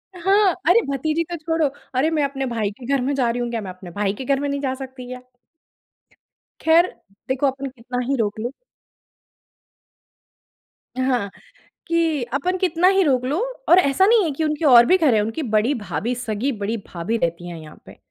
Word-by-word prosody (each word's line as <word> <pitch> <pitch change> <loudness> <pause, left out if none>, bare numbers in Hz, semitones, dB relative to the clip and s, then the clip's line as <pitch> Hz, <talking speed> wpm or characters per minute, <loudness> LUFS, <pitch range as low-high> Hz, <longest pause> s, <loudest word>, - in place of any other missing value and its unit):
हाँ। 385 +2 +3 0.2
"अरे! 460 +6 +6
भतीजी 310 +4 0
तो - - -2
छोड़ो, 325 -1 0 0.3
अरे! 270 +5 +2
मैं 310 -3 0
अपने 275 -1 -2
भाई 225 -5 -2
के 245 - -9
घर 275 0 +1
में 270 +3 0
जा 250 -3 +1
रही 245 +1 -2
हूँ। 240 - -2
क्या, 230 -2 -2
मैं 195 - -7
अपने 180 -1 -11
भाई 200 +1 -1
के 260 +5 -7
घर 275 +1 +1
में 285 - -2
नहीं 280 - -2
जा 260 -2 -1
सकती 260 -1 -9
क्या?" 250 0 -8 1.4
ख़ैर, 330 +3 +5 0.4
देखो 260 +2 +1
अपन 270 +1 -3
कितना 250 0 -6
ही 275 - +1
रोक 210 -1 -1
ले 235 +3 -2 2.5
हाँ, 250 -6 0 0.6
कि 325 -5 +1
अपन 360 +7 0
कितना 360 -1 +2
ही 390 0 +4
रोक 260 -6 +2
लो 285 +6 -1 0.3
और 355 +2 +8
ऐसा 360 +4 +3
नहीं 445 -1 +5
है 315 - -1
कि 315 +3 -3
उनके 305 +1 -1
और 240 -4 +8
भी 370 - +4
घर 310 -8 +3
हैं। 215 - +3
उनकी 225 +9 -3
बड़ी 220 +4 +1
भाभी, 205 - -3
सगी 240 +2 -2
बड़ी 215 -1 -3
भाभी 190 +7 -3
रहती 170 -2 -2
हैं 170 - -7
यहाँ 155 -1 -14
पे। - - -14
265 Hz, 200 wpm, -22 LUFS, 230-315 Hz, 2.5 s, और